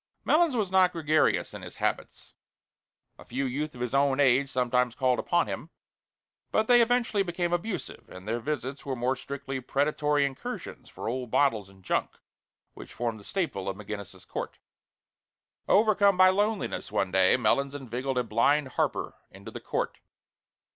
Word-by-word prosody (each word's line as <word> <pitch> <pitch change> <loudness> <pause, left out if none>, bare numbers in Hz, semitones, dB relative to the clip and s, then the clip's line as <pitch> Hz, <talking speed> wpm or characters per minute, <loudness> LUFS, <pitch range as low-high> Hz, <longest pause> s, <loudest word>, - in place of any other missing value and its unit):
Melons 320 -3 +3
was 205 -5 -1
not 185 -1 +4
gregarious 155 -1 +1
in - - -8
his - - -10
habits. - - -3 0.9
A - - -11
few 135 +3 -2
youth 145 +4 -3
of 120 - -9
his 125 0 -2
own 140 0 +2
age 135 0 +4
sometimes 125 -1 +1
called 130 -2 +1
upon 175 0 +1
him, 160 - -6 0.8
but 215 - +2
they 245 -1 +7
eventually 235 -3 +2
became 175 -1 -1
abusive, 185 +3 -4
and 90 +2 -11
their 115 +2 -1
visits 140 0 -4
were 135 -3 -3
more 125 +2 0
strictly 135 0 -6
predatory 145 +2 +1
incursions 135 -1 -6
for - - -7
old 125 +1 -3
bottles 110 -7 +2
and 95 -1 -19
junk - - -1 0.6
which - - -11
formed 115 -2 -3
the - - -14
staple 135 - -2
of 95 - -5
McGinnis's 100 -2 -8
Court. - - -5 1.1
Overcome 200 -2 +4
by 185 0 +7
loneliness 205 +2 -1
one 95 -1 0
day, 95 +3 +4
Melons 140 +4 +1
inveigled 130 0 -3
a 125 - +2
blind 130 +6 +2
harper - - -1 0.2
into - - -11
the - - -8
court. - - -3
140 Hz, 160 wpm, -28 LUFS, 120-175 Hz, 1.1 s, they